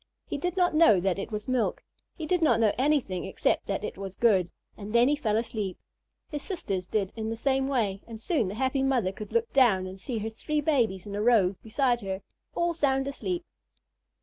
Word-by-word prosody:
He - - -4
did 355 +4 -2
not 355 -2 +3
know 310 - +6
that 190 +1 0
it 195 - -5
was 210 -1 -4
milk. 255 -3 0 0.3
He 320 - -5
did 355 +2 +1
not 310 - +4
know 220 -3 +3
anything 260 -9 +1
except 190 - 0
that 195 +1 -2
it 205 - -5
was 195 -1 -6
good, 195 -7 +3 0.3
and 210 0 -8
then 240 +1 +6
he 295 - +3
fell 220 -7 0
asleep. 220 -5 -3 0.5
His 295 -2 -3
sisters 195 - -3
did 200 -2 -1
in 220 -1 -3
the 225 - -2
same 265 +3 +1
way, 215 -8 0
and 225 -1 -8
soon 235 - 0
the 195 - -5
happy 265 +3 0
mother 255 -8 +1
could 210 +2 -9
look 465 0 0
down 225 -9 +4
and 185 +1 -8
see 235 +4 -3
her 220 +1 -3
three 300 +7 -2
babies 240 - +1
in 205 - -7
a 205 - -2
row 210 -5 +4
beside 240 +1 +1
her, 190 -1 -4 0.3
all 345 0 +1
sound 270 -4 +1
asleep. 345 +5 -3
230 Hz, 215 wpm, -28 LUFS, 200-280 Hz, 0.5 s, know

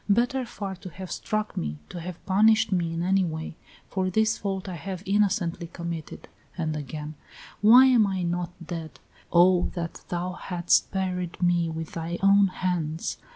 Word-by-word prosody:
Better 245 +4 +2
far 200 -5 -5
to 185 - -9
have 185 +1 -9
struck 215 -1 -2
me, 75 -1 -3
to 175 - -6
have 175 0 -8
punished 215 +3 +4
me 175 -3 +1
in 165 +1 -2
any 190 +1 +3
way, 160 -2 -4 0.3
for 185 -1 -1
this 220 +3 +2
fault 195 -1 -4
I 185 - -4
have 185 +1 -6
innocently 190 -4 +1
committed." 170 -2 -6 0.3
And 160 -3 -1
again: 150 +1 -6 0.5
"Why 240 +5 +9
am 245 -5 +5
I 190 -2 -2
not 175 0 -1 0.2
dead? 160 -1 -6 0.3
Oh, 175 +1 +5
that 170 -2 -5
thou 175 +1 -2
hadst 175 -1 +1
buried 180 -2 -2
me 175 -1 +2
with 160 0 -5
thy 170 +1 -4
own 200 0 +6
hands! 175 -4 -2
180 Hz, 165 wpm, -26 LUFS, 170-195 Hz, 0.5 s, Why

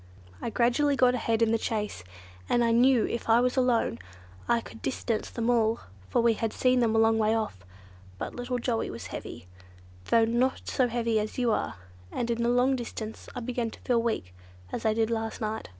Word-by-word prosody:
I - - -2
gradually 245 +5 +2
got 250 -2 +4
ahead 230 -2 +1
in 225 - +2
the 230 - +2
chase, 210 - -3 0.5
and 240 - +3
I 230 - +3
knew 245 +1 +5
if 235 - -4
I 225 +1 +6
were 250 +1 +2
alone 245 - +2 0.5
I 235 - +4
could 225 - -11
distance 230 -4 -2
them 230 -1 -3
all; 230 -2 +2 0.3
for - - +2
we 235 -1 +5
had 225 0 -2
seen 255 0 +3
them 225 -2 +2
a - - +3
long 225 0 +4
way 220 +1 +3
off. 215 - -3 0.5
But - - -5
little 245 +1 -2
Joey 235 -2 -1
was 115 - -7
heavy, 90 - -7 0.6
though 225 - +4
not 240 +3 0
so 255 - +2
heavy 230 -2 0
as 215 0 -4
you 245 -2 +2
are, - - -1 0.4
and 240 -1 -2
in 235 0 -1
the 235 - +2
long 250 +2 +3
distance 225 -3 -6
I 250 - -4
began 240 -1 -2
to - - -12
feel 240 -2 +2
weak, 220 - -2 0.4
as - - -2
I 215 - +2
did 225 0 +1
last 225 -1 -2
night. 220 0 -3
230 Hz, 210 wpm, -28 LUFS, 225-245 Hz, 0.6 s, I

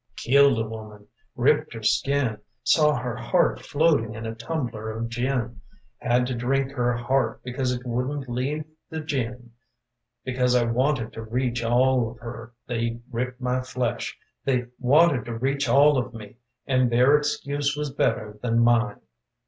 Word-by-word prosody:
Killed 140 0 +4
a 110 -1 -1
woman: 110 -2 -9 0.3
ripped 150 +2 +2
her 110 - -7
skin. 135 -2 +1 0.2
Saw 150 +3 +4
her 120 -1 -3
heart 125 +9 +1
floating 145 -8 +2
in 115 0 -6
a 110 - -3
tumbler 115 -3 -4
of 115 +1 -4
gin. 120 -3 -2 0.4
Had 125 +1 +2
to 130 - -2
drink 135 +3 0
her 120 -2 0
heart 130 +3 0
because 125 +1 -2
it 125 0 -4
wouldn't 130 +3 -2
leave 135 +5 -2 0.2
the 160 - -4
gin. 125 -5 -4 0.7
Because 125 -1 +1
I 125 - +4
wanted 120 0 0
to 115 - -6
reach 120 +1 -2
all 125 0 +3
of 120 - -12
her 115 0 -8
They 115 -1 -2
ripped 125 +2 -3
my 125 0 0
flesh. 125 -2 -3 0.3
They 125 -2 +1
wanted 140 -1 +4
to 115 -1 -5
reach 135 +3 0
all 145 0 +5
of 125 -1 -5
me 105 0 -10 0.3
And 130 -2 +2
their 125 +5 +5
excuse 145 0 -1
was 150 -1 -2
better 105 -6 -1
than 115 -2 0
mine. 115 -3 +3
125 Hz, 160 wpm, -25 LUFS, 115-135 Hz, 0.7 s, all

